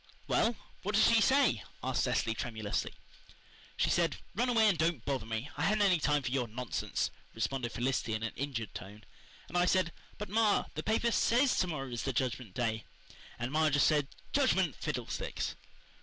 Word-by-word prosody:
"Well, 230 +1 +2 0.3
what 210 +2 -2
does 215 - +6
she 230 -1 +5
say?" 265 - +4 0.2
asked - - 0
Cecily 115 - +1
tremulously. 110 -2 -3 0.9
"She - - +2
said, 170 -3 +2 0.2
'Run 245 +5 +1
away 225 -3 +5
and 200 - +4
don't 160 -6 0
bother 130 -5 -2
me. 115 +5 -3
I - - -5
haven't 210 +1 +3
any 185 -4 +4
time 145 -1 +1
for 125 - -2
your 130 -2 0
nonsense.'" 120 +2 -2 0.2
responded 120 +1 -2
Felicity 120 -2 -1
in 110 - -4
an 115 - -3
injured 125 -6 -4
tone. 105 +3 -9 0.4
"And 170 - -10
I 175 0 +4
said, 180 -1 +2 0.3
'But, 210 -1 -5
ma, 215 0 +3
the 155 - -3
paper 225 +5 +1
SAYS 250 +4 +3
to 185 - +2
morrow 135 -6 -4
is 120 -1 -3
the 135 - -2
Judgment 125 -5 -2
Day,' 110 -3 -1 0.5
and 120 +2 -3
ma 155 +1 +3
just 140 -1 +4
said 150 -3 +3 0.3
'Judgment 190 - +3
Fiddlesticks! - - -3
145 Hz, 185 wpm, -32 LUFS, 120-200 Hz, 0.9 s, does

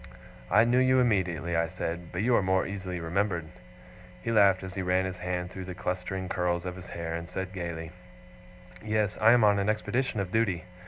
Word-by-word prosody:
'I - - +6
knew 120 +2 +3
you 130 0 +4
immediately,' 90 -8 +1
I 85 0 +2
said; 85 0 -5
'but 90 +3 -2
you 125 +2 +3
are - - +4
more 95 0 +2
easily 95 -3 -5
remembered.' 90 +1 -1 0.8
He 115 - -1
laughed 100 -4 +5
as 95 0 -7
he 95 - -3
ran 90 +1 +1
his 90 -1 -5
hand 90 0 -3
through 95 -1 -7
the 90 -1 -7
clustering 95 0 -3
curls 90 -1 -1
of 90 -1 -4
his 95 - -10
hair, 85 -1 -5
and 85 +1 -5
said 95 +1 -5
gaily: 85 -3 -5 0.9
'Yes, 105 -1 0
I 110 +1 +7
am 120 -2 +5
on 105 -1 +5
an 100 +1 0
expedition 110 +2 -1
of 95 -2 -3
duty. 100 -5 +1
95 Hz, 205 wpm, -28 LUFS, 90-105 Hz, 0.9 s, I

